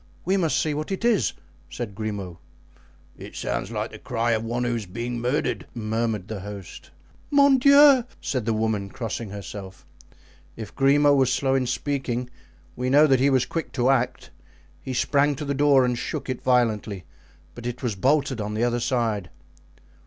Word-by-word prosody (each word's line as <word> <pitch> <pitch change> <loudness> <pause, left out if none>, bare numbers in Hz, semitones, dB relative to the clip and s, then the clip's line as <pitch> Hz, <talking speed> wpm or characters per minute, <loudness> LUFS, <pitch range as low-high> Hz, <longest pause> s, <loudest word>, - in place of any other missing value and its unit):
"We 190 +3 +2
must 170 -5 +1
see 155 - 0
what 155 +5 -4
it 195 +4 -2
is," 215 - +2 0.4
said 120 -5 -6
Grimaud. 100 -4 -5 0.8
"It - - -10
sounds - - -3
like - - -3
the - - -10
cry 120 -1 -1
of 110 -1 0
one 120 +2 -2
who 120 -1 0
is 110 -4 -4
being 120 +6 -4
murdered," 125 +5 -1
murmured 110 -3 -2
the 110 -2 -5
host. 100 0 -9 0.4
"Mon 280 -2 +5
Dieu!" 280 -1 +7 0.2
said 125 -5 -3
the 115 - +1
woman, 110 -2 -1
crossing 115 0 -5
herself. 100 -1 -9 0.7
If 110 -3 -8
Grimaud 145 +1 +4
was 130 -2 +3
slow 135 -1 +1
in 130 -2 +1
speaking, 125 -2 -2 0.4
we 125 +1 -2
know 145 +3 +6
that 135 -4 +3
he 135 +2 +4
was 130 -3 +2
quick 165 -2 -5
to 130 0 +2
act; 125 -2 -1 0.5
he 130 - -5
sprang 145 +3 +2
to 150 - -5
the 140 - -1
door 140 -2 +4
and 125 0 0
shook 125 - -4
it 130 - -5
violently, 110 -6 +1 0.5
but 120 0 -7
it 125 +1 -6
was 120 -3 0
bolted 130 +2 +1
on 105 +1 -4
the 110 - 0
other 120 0 +1
side. 115 -7 -1
120 Hz, 180 wpm, -24 LUFS, 110-140 Hz, 0.8 s, Dieu